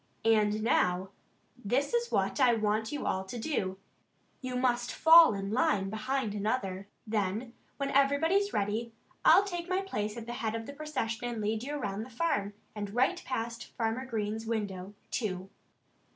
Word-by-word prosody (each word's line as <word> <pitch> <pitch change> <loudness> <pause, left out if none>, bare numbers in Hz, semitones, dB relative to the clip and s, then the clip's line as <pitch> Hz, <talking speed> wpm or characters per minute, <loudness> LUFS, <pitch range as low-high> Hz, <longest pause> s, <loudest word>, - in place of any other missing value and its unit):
"And 215 -1 +3
now 185 -4 +2 0.5
this 260 - 0
is 475 0 0
what - - 0
I 250 -3 +5
want 215 0 0
you 295 - -4
all 190 - 0
to 215 +6 -6
do: 210 -7 -2 0.6
you 255 -1 -4
must 245 -1 +1
fall 325 -7 +7
in 195 0 -4
line 215 -4 +2
one 195 - -3
behind 220 0 -2
another. 200 -2 -2 0.3
And 215 +4 -1 0.2
when 275 -1 -2
everybody's 320 +9 +3
ready 215 +3 -1 0.3
I'll 395 - +7
take 350 -3 -5
my 370 +1 +1
place 215 - -3
at 230 - -6
the 240 - -5
head 225 -3 -2
of 225 0 -4
the 280 - -8
procession 265 -6 -3
and 235 -2 -4
lead 215 +1 -1
you 280 +4 -5
all 295 - -2
around 200 0 -3
the 235 - -7
farm, 215 -7 -1 0.2
and 205 0 -5
right 265 +9 +2
past 230 -2 -4
Farmer 230 +3 -2
Green's 220 -1 -3
window, 205 -3 -3 0.2
too." 190 -4 -3
225 Hz, 175 wpm, -30 LUFS, 210-265 Hz, 0.6 s, fall